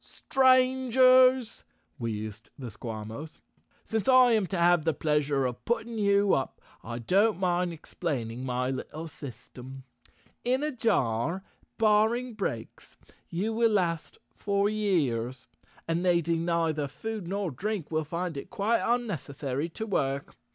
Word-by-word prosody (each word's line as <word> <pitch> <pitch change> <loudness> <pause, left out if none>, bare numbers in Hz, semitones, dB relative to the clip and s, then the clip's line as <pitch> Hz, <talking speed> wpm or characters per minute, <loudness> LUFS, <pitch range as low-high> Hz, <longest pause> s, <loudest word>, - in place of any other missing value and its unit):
"Strangers," 255 -1 +4 0.4
wheezed 110 -2 -5
the 125 -4 -7
Squawmos, 110 +7 -7 0.5
"since 220 -4 -2
I 255 -2 +7
am 215 -4 +2
to 190 - -3
have 175 -1 +4
the 160 -2 0
pleasure 150 -3 +1
of. 125 -1 -4
putting 235 -1 -2
you 200 -1 +3
up 135 - -1 0.2
I 120 +1 -5
don't 190 - +2
mind 180 -1 +1
explaining 130 -7 -4
my 125 0 -1
little 155 +5 -6
system. 130 -1 -10 0.6
In 255 +3 +1
a 305 - 0
jar, 180 - 0 0.3
barring 225 +3 +2
breaks, 155 - -5 0.3
you 200 +6 -2
will 230 -1 +2
last 170 -5 -1 0.2
for 200 0 0
years, 135 - -1 0.4
and 165 +1 0
needing 170 -2 +1
neither 165 -4 0
food 215 +6 -6
nor 195 -2 -2
drink 190 - -4
will 155 0 0
find 170 +1 -4
it 140 - -7
quite 220 +4 +1
unnecessary 150 - -2
to 220 +6 -5
work. 140 -9 -1
170 Hz, 130 wpm, -28 LUFS, 135-220 Hz, 0.6 s, I